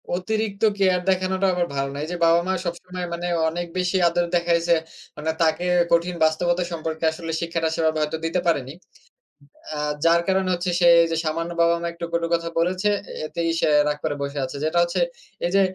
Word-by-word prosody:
অতিরিক্ত 215 +2 -2
কেয়ার 185 -2 +2
দেখানোটা 185 +1 +1
আবার 175 -1 0
ভালো 135 0 -1
না। 140 - -7
এই 155 - -4
যে, 180 - -2
বাবা-মা 170 +3 +3
সবসময় 180 +1 -5
মানে 175 +1 -3 0.2
অনেক 175 +2 -3
বেশি 180 +1 +1
আদর 175 +1 +1
দেখাইছে, 170 0 +2 0.4
মানে 155 +1 -1
তাকে 165 +2 +2 0.3
কঠিন 170 +1 +2
বাস্তবতা 175 +3 +2
সম্পর্কে 160 -1 -4
আসলে 165 0 -6
শিক্ষাটা 165 -1 -1
সেই 165 - -1
ভাবে 160 0 +1
হয়তো 150 +1 -1
দিতে 165 +2 0
পারেনি। 135 -6 0 1.0
আ - - -5 0.3
যার 170 +1 +5
কারণে 190 0 +1
হচ্ছে 175 +1 -2
সে 175 - +4 0.2
এই 165 - +1
যে, - - 0
সামান্য 165 +2 -2
বাবা-মা 170 0 +2
একটু, 170 0 -7
কটু 170 0 0
কথা 170 0 -1
বলেছে, 185 +4 +1 0.4
এতেই 165 +2 -2
সে - - +2 0.2
রাগ 150 - 0
করে 155 -2 0
বসে 140 +1 -4
আছে। 130 - -6
যেটা 160 +2 +1
হচ্ছে 170 - -2 0.5
এই 175 - -1
যে, 195 - +5
170 Hz, 190 wpm, -23 LUFS, 160-180 Hz, 1.0 s, যার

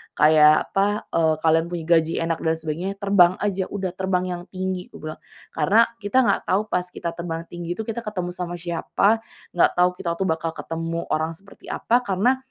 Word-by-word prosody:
kayak 155 0 +5
apa, 205 +2 0
eee, 160 -1 +2
kalian 165 +1 +4
punya 170 -2 -3
gaji 160 0 0
enak 165 -1 -1
dan 160 0 +1
sebagainya, 165 +4 -3
terbang 195 -3 +5
aja, 195 -2 0
udah 190 -3 -3
terbang 190 -1 0
yang 175 -1 -4
tinggi," 185 -1 -3
aku - - -9
bilang. - - -8 0.3
"Karena 205 +10 +3
kita 220 +4 +2
nggak 245 - +2
tahu 195 - +3
pas 180 -2 0
kita 180 -1 -5
terbang 165 -1 -4
tinggi 175 0 -5
itu, 220 - -5
kita 225 +1 -4
ketemu 185 -4 -3
sama 175 -1 -5
siapa, 175 +5 +1 0.4
nggak - - +5
tahu 180 0 +5
kita 170 - -3
tuh 190 - +1
bakal 160 0 -1
ketemu 165 +1 -4
orang 160 +1 0
seperti 195 +4 -16
apa." 245 +2 +1
Karena 205 +7 +2
180 Hz, 190 wpm, -23 LUFS, 165-195 Hz, 0.4 s, kayak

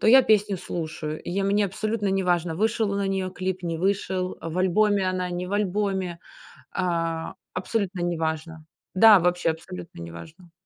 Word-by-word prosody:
то - - 0
я 260 +4 +8
песню 210 -4 +3
слушаю, 155 -3 -5
и - - -6
я 195 +2 0
мне 205 +1 +3
абсолютно 210 +2 -1
неважно, 180 -4 +1
вышел 220 +1 +1
на 200 0 -1
нее 190 -1 -1
клип, 185 0 -3
не 165 -2 -2
вышел, 190 -1 -1
в 165 +2 -4
альбоме 195 +1 +3
она, 185 -1 -1
не 180 +1 -3
в 190 - -6
альбоме, 195 -3 -1 0.5
а, 165 -3 -1 0.2
абсолютно 190 -1 -2
неважно. 160 -2 -2 0.3
Да, 215 0 +8
вообще 180 -1 +1
абсолютно 90 - -9
неважно. 160 - -10
185 Hz, 160 wpm, -25 LUFS, 165-200 Hz, 0.5 s, я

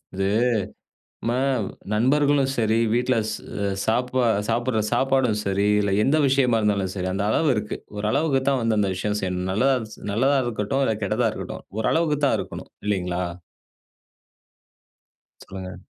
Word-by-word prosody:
இது 95 0 0 1.0
நம்ம 120 +1 0 0.6
நண்பர்களும் 140 +4 +3
சரி, 110 0 +2 0.2
வீட்ல 125 0 +1
ஸ் - - -2 0.3
அ - - +1 0.2
சாப்பா 125 +2 +1 0.2
சாப்பிடுற 120 0 0
சாப்பாடும் 130 -2 +2
சரி, 100 +1 +1
இதுல 100 -1 +1
எந்த 145 +4 +3
விஷயமா 130 -4 +3
இருந்தாலும் 100 -3 0
சரி, 95 -1 -2
அந்த 100 +1 -1
அளவு 155 +6 +2
இருக்கு. 105 0 -3 0.2
ஓரளவுக்கு 135 +7 +1
தான் 135 -2 +2
வந்து 110 -2 +1
அந்த 100 -2 +1
விஷயம் 105 +2 -2
செய்யணும். 90 0 -2
நல்லதாஞ்ச் 125 0 +1 0.2
நல்லதா 135 +6 +3
இருக்கட்டும், 115 +4 -1
இல்ல 110 - +1
கெட்டதா 110 +3 +1
இருக்கட்டும். - - -7 0.2
ஓரளவுக்கு 150 +5 +1
தான் - - +3
இருக்கணும். - - -7 0.2
இல்லைங்களா? 90 -3 -1 2.2
சொல்லுங்க. 95 -1 -8
115 Hz, 135 wpm, -24 LUFS, 100-130 Hz, 2.2 s, நண்பர்களும்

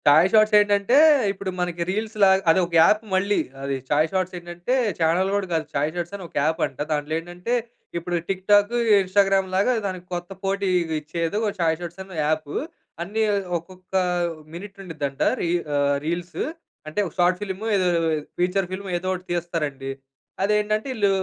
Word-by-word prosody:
చాయ్ 155 +5 +7
shorts 215 0 +5
ఏంటంటే 205 +3 +2 0.4
ఇప్పుడు 195 0 -5
మనకి 175 -1 -2
రీల్స్ 215 +3 -2
లాగా 190 0 +6
అది 165 - +5
ఒక 170 - -12
యాప్ 210 +5 +4
మళ్ళీ. 200 +2 +2 0.2
అది 140 0 -1
చాయ్ 150 +2 +3
షార్ట్స్ 185 -1 -1
ఏంటంటే 175 +6 -4 0.3
చానెల్ 170 +4 +2
గూడా 200 -1 0
కాదు. 160 -1 0
చాయ్ 145 +2 0
షార్ట్స్ 175 +1 -4
అని 195 - -7
ఒక - - -26
యాప్ 160 +2 0
అంట. 135 -3 -9
దాంట్లో 150 0 -1
ఏంటంటే 175 +7 -5 0.4
ఇప్పుడు 175 +1 -3
టిక్ 190 -1 -2
టాక్, 205 +2 +5 0.3
ఇన్స్టాగ్రామ్ 195 0 +2
లాగా 200 +6 +3
దానికి 185 -2 -4
కొత్త 175 +1 -4
పోటీ 195 0 0 0.3
ఇచ్చేది 165 +4 -2
ఓ - - +2
చాయ్ 160 -2 +2
షార్ట్స్ 175 +2 -7
అని 190 -3 -10
యాప్. 155 -1 -1 0.5
అన్నీ 215 +5 -1 0.3
ఒక్కొక్క 185 +2 -14 0.6
మినిట్ 195 +3 -9
ఉండుద్దంట. 145 -6 -5 0.2
రీ 170 - 0 0.2
ఆహ్, 145 0 +2
రీల్స్. 170 +2 -3 0.5
అంటే 155 +6 -3
ఒక - - -11
షార్ట్ 180 +1 +3
ఫిల్మ్ 195 +1 -5
ఏదో 185 -1 +2 0.5
ఫీచర్ 180 +1 +1
ఫిల్మ్ 195 +1 -5
ఏదో 185 - -6
ఒకటి 185 0 -6
తీస్తారండి. 150 -6 -2 0.5
అదేంటంటే 210 +2 +1
ఈళ్ళు 205 -3 +2
180 Hz, 165 wpm, -23 LUFS, 165-195 Hz, 0.6 s, చాయ్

